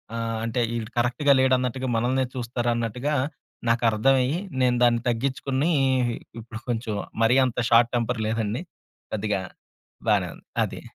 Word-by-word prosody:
ఆహ్, 115 -1 -2
అంటే 115 +2 -1 0.2
ఈడు 115 -1 -4
కరెక్ట్‌గా 125 +4 +3
లేడు 130 0 +4
అన్నట్టుగా 130 +1 -2
మనల్నే 125 +3 +1
చూస్తారన్నట్టుగా, 120 +2 -1 0.5
నాకర్థమయ్యి, 125 +5 +3 0.2
నేను 125 -1 +3
దాన్ని 120 -1 +4
తగ్గిచ్చుకుని 135 +5 0 0.7
ఇప్పుడు 115 -1 -8
కొంచెం 115 -2 -2 0.3
మరీ 115 +3 +4
అంత 125 -2 -2
షార్ట్ 120 0 +5
టెంపర్ 120 -1 0
లేదండి. 110 +2 -1 0.5
కొద్దిగా 105 -2 -1 0.7
బానే - - +3
ఉంది. - - -20 0.2
అది. - - -5
120 Hz, 125 wpm, -25 LUFS, 115-130 Hz, 0.7 s, షార్ట్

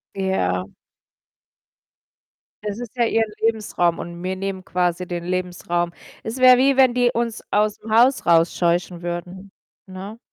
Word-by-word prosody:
Ja. 95 - -1 2.0
Es 210 +1 -4
ist 245 0 -8
ja 240 - +2
ihren 225 -1 +1
Lebensraum 210 -6 0
und 170 0 -7
mir 185 +1 -3
nehmen 190 -1 -5
quasi 180 0 -1
den 175 -1 -5
Lebensraum. 175 -1 -2 0.3
Es 225 +4 -5
wäre 255 -1 +7
wie, 270 +2 +3
wenn 260 -2 +5
die 245 -1 +2
uns 230 -1 -2
aus'm 210 +1 0
Haus 245 +4 +4
rausscheuchen 170 +1 +2
würden, 180 +3 -6 0.3
ne? 195 +4 -9
190 Hz, 135 wpm, -22 LUFS, 175-225 Hz, 2.0 s, wäre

